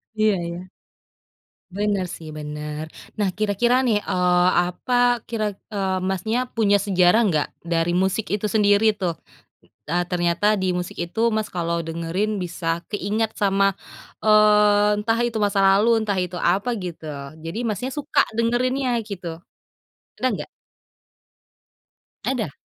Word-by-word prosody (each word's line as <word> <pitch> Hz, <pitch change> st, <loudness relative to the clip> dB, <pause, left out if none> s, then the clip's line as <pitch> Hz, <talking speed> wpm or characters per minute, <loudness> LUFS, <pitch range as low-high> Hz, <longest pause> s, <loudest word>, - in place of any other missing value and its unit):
Iya 215 Hz, -1 st, +3 dB
ya. 175 Hz, +2 st, -7 dB, 1.1 s
Bener 205 Hz, -2 st, 0 dB
sih, 160 Hz, -2 st, -10 dB
bener 150 Hz, +1 st, -5 dB, 0.3 s
nah 205 Hz, -2 st, +1 dB
kira-kira 215 Hz, +4 st, +2 dB
nih 225 Hz, -4 st, +3 dB
eee, 180 Hz, 0 st, +3 dB, 0.2 s
apa 245 Hz, +6 st, +1 dB
kira 225 Hz, -2 st, -1 dB, 0.3 s
eee, 190 Hz, -2 st, 0 dB
Mas, 190 Hz, -1 st, -1 dB
nya 225 Hz, +3 st, +1 dB, 0.2 s
punya 205 Hz, -2 st, +4 dB
sejarah 190 Hz, +2 st, +4 dB
enggak 160 Hz, -9 st, +1 dB
dari 165 Hz, 0 st, 0 dB
musik 190 Hz, +4 st, +1 dB
itu 210 Hz, +1 st, -1 dB
sendiri 205 Hz, +1 st, +4 dB
tuh? 180 Hz, -4 st, -1 dB, 0.8 s
Eee, 175 Hz, +1 st, +2 dB
ternyata 175 Hz, +1 st, 0 dB, 0.2 s
di 185 Hz, -1 st, +1 dB
musik 180 Hz, -1 st, -5 dB
itu 175 Hz, +6 st, -5 dB, 0.2 s
Mas, 220 Hz, -, 0 dB
kalau 170 Hz, -1 st, -1 dB
dengerin 170 Hz, +6 st, -2 dB
bisa 170 Hz, -1 st, -2 dB
keingat 210 Hz, +2 st, -1 dB
sama 195 Hz, -1 st, +2 dB, 0.6 s
eee, 210 Hz, -1 st, +5 dB
entah 225 Hz, +2 st, 0 dB
itu 230 Hz, -2 st, -4 dB
masa 200 Hz, -1 st, 0 dB
lalu, 195 Hz, +3 st, +4 dB
entah 205 Hz, -3 st, -1 dB
itu 180 Hz, 0 st, -7 dB
apa 195 Hz, +7 st, +1 dB, 0.2 s
gitu, 170 Hz, -2 st, -7 dB, 0.4 s
jadi 165 Hz, +6 st, -5 dB
Mas, 210 Hz, -3 st, -1 dB
nya 265 Hz, -, -3 dB
suka 295 Hz, -1 st, +1 dB, 0.2 s
dengerinnya 245 Hz, +2 st, +1 dB
gitu, 190 Hz, -5 st, -7 dB, 0.9 s
ada 255 Hz, -, +1 dB
enggak? -, -, -5 dB, 1.8 s
Ada? 245 Hz, -, -1 dB
200 Hz, 135 wpm, -23 LUFS, 175-220 Hz, 1.8 s, eee